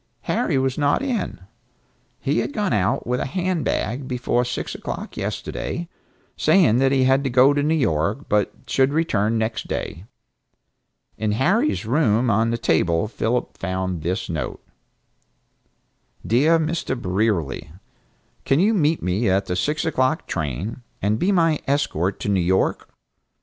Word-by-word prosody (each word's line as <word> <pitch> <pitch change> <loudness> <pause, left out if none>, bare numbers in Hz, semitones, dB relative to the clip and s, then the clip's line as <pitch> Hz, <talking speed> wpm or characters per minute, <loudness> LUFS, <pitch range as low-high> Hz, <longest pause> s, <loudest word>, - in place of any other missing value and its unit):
Harry - - 0
was 130 +1 0
not 145 - +2
in. 255 -5 -2 0.8
He - - 0
had - - -2
gone 210 - 0
out 105 +6 +1
with 125 +1 -1
a - - -2
hand 180 +1 -1
bag 125 +5 -2
before 125 -1 0
six 125 0 -4
o'clock - - -6
yesterday, 170 0 -4 0.5
saying 130 - +4
that 135 0 +3
he 135 -1 +3
had 135 +1 +3
to 135 - 0
go 130 +3 +5
to 145 - +1
New 155 +3 +2
York, 105 - 0
but 105 -1 +1
should 135 +2 +2
return 115 -9 +1
next 110 +1 -2
day. 90 - -4 1.1
In 110 -1 0
Harry's 190 - +1
room 120 -2 +2
on 110 +3 +2
the 115 - 0
table 85 -2 +1
Philip 115 +2 -2
found 95 -2 -2
this 90 +7 -2
note: 80 -3 -4 1.6
"Dear 145 +9 +4
Mr. 160 -5 -2
Brierly: 90 - -1 0.7
Can 135 - +2
you 210 +5 +4
meet 160 -5 +1
me 95 +5 +1
at 95 +2 +2
the 90 - -2
six 150 - -1
o'clock 135 -1 +1
train, 85 - -4 0.2
and 105 +3 0
be 190 - +2
my 165 -5 +3
escort 100 - 0
to - - -3
New 100 -2 +2
York? 95 +2 0
125 Hz, 150 wpm, -22 LUFS, 100-150 Hz, 1.6 s, go